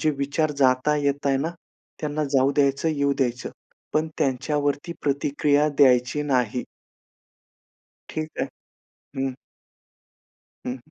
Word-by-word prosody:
जे 155 - +3
विचार 145 +3 0
जात 130 +1 +3
आहे, 150 -1 +2
येत 140 0 0
आहे 135 - +3
ना, 150 +5 -1 0.5
त्यांना 150 0 -1
जाऊ 135 +1 +4
द्यायचं 140 +2 +2
येऊ 140 -2 +1
द्यायचं. 125 -2 -1 0.4
पण 155 +1 +1
त्यांच्यावरती 145 +2 0
प्रतिक्रिया 145 +1 +2
द्यायची 125 +1 +4
नाही. 125 -4 0 1.5
ठीक 155 0 -3
आहे, - - -1 0.7
हं. 135 -1 0 1.3
हं, - - -1
हं - - -10
140 Hz, 120 wpm, -24 LUFS, 135-150 Hz, 1.5 s, जाऊ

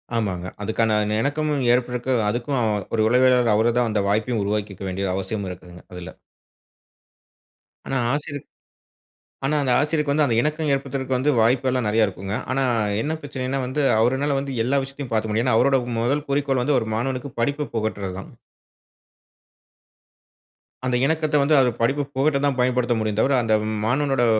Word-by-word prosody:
ஆமாங்க, 95 -6 -2 0.2
அதுக்கான 110 +1 +1
அந்த 105 0 -2
இணக்கமும் 145 +1 -1
ஏற்படரதுக்கு. 125 +1 -1 0.2
அதுக்கும் 120 +5 -2
அவ 110 - +1 0.3
ஒரு 110 - +1
உளவியலாளர், 125 -1 +4
அவரு 115 +2 +3
தான் 120 -2 +2
அந்த 105 - +1
வாய்ப்பையும் 110 +2 0
உருவாக்கிக்க 100 -1 -3
வேண்டிய 95 +1 -2
அவசியம் 95 +1 -3
இருக்குங்க 90 -1 -11
அதுல. 90 -1 -8 1.7
ஆனா, 135 - -1 0.2
ஆசிரியர் 145 -1 -4 1.0
ஆனா 150 +3 +1
அந்த 130 - +1
ஆசிரியருக்கு 150 -1 0
வந்து 150 0 +3
அந்த 115 -4 0
இணக்கம் 150 +2 -1
ஏற்படுத்துறக்கு 135 0 -1
வாய்ப்பு 125 +4 +2
எல்லாம் 125 -3 -1
நிறைய 110 0 +3
இருக்குங்க. 95 +1 -5 0.2
ஆனா, 135 +1 +1 0.4
என்ன 155 - -2
பிரச்சனைன்னா, 135 -2 -3
வந்து 145 +4 -1 0.2
அவருனால 135 +4 +1
வந்து 135 -1 -5
எல்லா 135 +4 +1
விஷயத்தையும் 135 -1 -7
பார்த்துக்க 110 -1 0
முடியாது 115 +2 +1
ஏன்னா 125 -3 +3
அவருடைய 135 0 +3 0.2
முதல் 140 +6 0
குறிக்கோள் 140 -3 +1
வந்து, 145 +1 +2
ஒரு 110 - -5
மாணவனுக்கு 130 +3 -3
படிப்ப 145 +2 -1
புகட்டுறது 105 -4 -3
தான். - - -11 2.6
அந்த 125 - 0
இணக்கத்த 155 -1 0
வந்து 150 +1 +3
அவர் 130 -2 +4
படிப்பு 140 +5 +1
புகட்ட 140 +1 +2
தான் 140 -2 0
பயன்படுத்த 125 -1 +1
முடியும் 110 -1 -1
தவிர, 135 +4 +3
அந்த 110 - +1 0.3
மாணவனோடு 135 0 +1
125 Hz, 155 wpm, -23 LUFS, 110-140 Hz, 2.6 s, உளவியலாளர்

